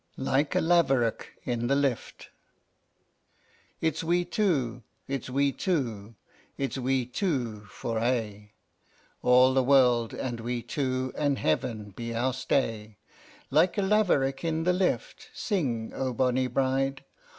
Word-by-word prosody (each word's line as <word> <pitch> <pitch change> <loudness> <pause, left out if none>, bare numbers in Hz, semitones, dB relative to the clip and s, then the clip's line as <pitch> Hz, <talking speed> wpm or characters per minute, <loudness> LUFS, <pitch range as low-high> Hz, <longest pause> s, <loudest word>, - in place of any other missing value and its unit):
LIKE 135 +2 0
A - - +3
LAVEROCK 135 -9 +2
IN 120 -1 -2
THE 140 - +2
LIFT. 140 -4 -2
I. - - -17
It's 160 -1 0
we 175 +2 +1
two, 150 - 0 0.3
it's 135 -2 -4
we 140 +2 +2
two, 115 - -2 0.4
it's 135 -1 -2
we 130 0 0
two 120 - -2
for 115 +3 -4
aye, 110 -4 -2 0.7
All 125 +1 +5
the 135 - +4
world 125 -3 +3
and 120 -3 -4
we 120 +1 -3
two, 130 -2 -2
and 145 -2 +1
Heaven 105 +6 -1
be 115 +3 -6
our 125 +3 0
stay. 115 -5 -1 0.5
Like 170 +6 +3
a 200 - +2
laverock 175 -10 +2
in 165 -1 -1
the 180 +2 +3
lift, 190 - -1
sing, 130 - -2
O 130 -1 -2
bonny 130 +1 +1
bride! 135 +1 0
130 Hz, 135 wpm, -28 LUFS, 120-145 Hz, 0.7 s, All